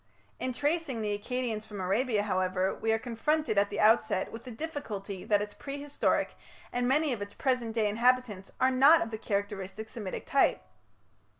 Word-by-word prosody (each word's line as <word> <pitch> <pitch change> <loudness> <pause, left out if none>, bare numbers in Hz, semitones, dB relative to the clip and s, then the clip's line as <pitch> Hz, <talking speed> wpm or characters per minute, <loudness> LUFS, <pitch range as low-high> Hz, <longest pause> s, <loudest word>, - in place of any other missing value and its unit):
In 255 - -1
tracing 290 -3 -1
the 205 -1 0
Akkadians 225 0 -3
from 210 -2 -7
Arabia, 205 +4 +1
however, 185 -1 0
we 225 - -1
are 225 - +3
confronted 245 +1 0
at 200 0 +2
the - - -4
outset 215 -3 +3
with 225 +2 -9
the - - -7
difficulty 220 - -5
that 205 -1 +3
its 205 0 -8
prehistoric, 285 +1 -1 0.4
and 245 0 0
many 290 +1 +2
of 220 - -5
its 205 0 -6
present 250 -4 0
day, 220 -2 +2
inhabitants 230 -3 +1
are 260 0 +4
not 280 +5 +7
of 225 - -7
the 220 - -4
characteristic 200 0 -3
Semitic 210 -5 -6
type. 275 - +3
225 Hz, 175 wpm, -30 LUFS, 205-255 Hz, 0.4 s, not